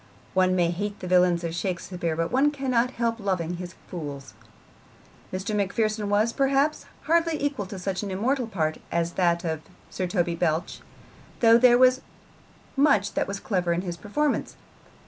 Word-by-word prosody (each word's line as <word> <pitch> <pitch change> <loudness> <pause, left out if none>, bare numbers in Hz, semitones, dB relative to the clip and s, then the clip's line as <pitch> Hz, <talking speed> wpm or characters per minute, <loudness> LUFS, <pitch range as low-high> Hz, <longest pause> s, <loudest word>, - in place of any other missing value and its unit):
One 185 -1 +3
may 175 -2 +2
hate 205 +4 -4
the 185 - -6
villains 180 -1 +3
of 165 -1 -3
Shakespeare, 175 -1 -3
but 165 +1 -1
one 270 +4 +4
cannot 255 -4 0
help 230 0 0
loving 180 -4 -2
his 180 0 -8
fools. 145 -7 -7 1.0
Mr. 190 +3 -3
Macpherson 210 +1 0
was, 215 +3 +2
perhaps, 275 +2 +1 0.2
hardly 330 -1 +2
equal 280 -9 -2
to 195 0 -7
such 185 0 -3
an 205 - -4
immortal 240 +6 0
part 160 -7 -2
as 170 0 0
that 170 -1 +1
of 160 -2 -2 0.3
Sir 185 - -2
Toby 175 -2 0
Belch, 165 0 -1 0.6
though 230 0 +7
there 240 0 +6
was 255 +1 +5 0.7
much 270 -9 +3
that - - 0
was 200 0 -4
clever 180 -5 0
in 170 - -1
his 175 -2 -4
performance. 275 - -1
195 Hz, 165 wpm, -26 LUFS, 175-235 Hz, 1.0 s, though